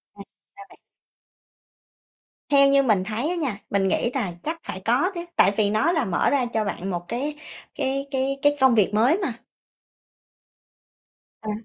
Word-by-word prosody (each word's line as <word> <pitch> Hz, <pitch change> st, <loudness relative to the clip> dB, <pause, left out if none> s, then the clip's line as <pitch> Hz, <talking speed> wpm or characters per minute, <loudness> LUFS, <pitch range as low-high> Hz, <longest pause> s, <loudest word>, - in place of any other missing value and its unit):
À, -, -, -11 dB, 0.3 s
sao 400 Hz, 0 st, -12 dB
bạn? -, -, -19 dB, 1.7 s
Theo 275 Hz, -1 st, +5 dB
như 275 Hz, 0 st, +4 dB
mình 210 Hz, -7 st, +2 dB
thấy 220 Hz, -, -2 dB
á 360 Hz, -, -1 dB
nha, 270 Hz, -12 st, -2 dB
mình 195 Hz, -1 st, +1 dB
nghĩ 235 Hz, -, +1 dB
tà 185 Hz, -, -1 dB
chắc 330 Hz, +2 st, -4 dB
phải 190 Hz, -, -6 dB
có 265 Hz, -, +2 dB
chứ, 345 Hz, 0 st, -5 dB
tại 195 Hz, -, +5 dB
vì 205 Hz, -2 st, +2 dB
nó 245 Hz, +11 st, +2 dB
là 315 Hz, -7 st, 0 dB
mở 180 Hz, -3 st, +1 dB
ra 270 Hz, -3 st, +1 dB
cho 220 Hz, -1 st, +1 dB
bạn 195 Hz, -1 st, -4 dB
một 175 Hz, -2 st, -4 dB
cái 280 Hz, +6 st, -3 dB, 0.4 s
cái 275 Hz, 0 st, -2 dB
cái 270 Hz, +1 st, -1 dB
cái 290 Hz, 0 st, +3 dB
công 260 Hz, -3 st, +5 dB
việc 210 Hz, -1 st, +2 dB
mới 245 Hz, -, +3 dB
mà. 320 Hz, -, -2 dB, 2.1 s
Ờ. 215 Hz, -1 st, -4 dB
260 Hz, 175 wpm, -24 LUFS, 210-290 Hz, 2.1 s, Theo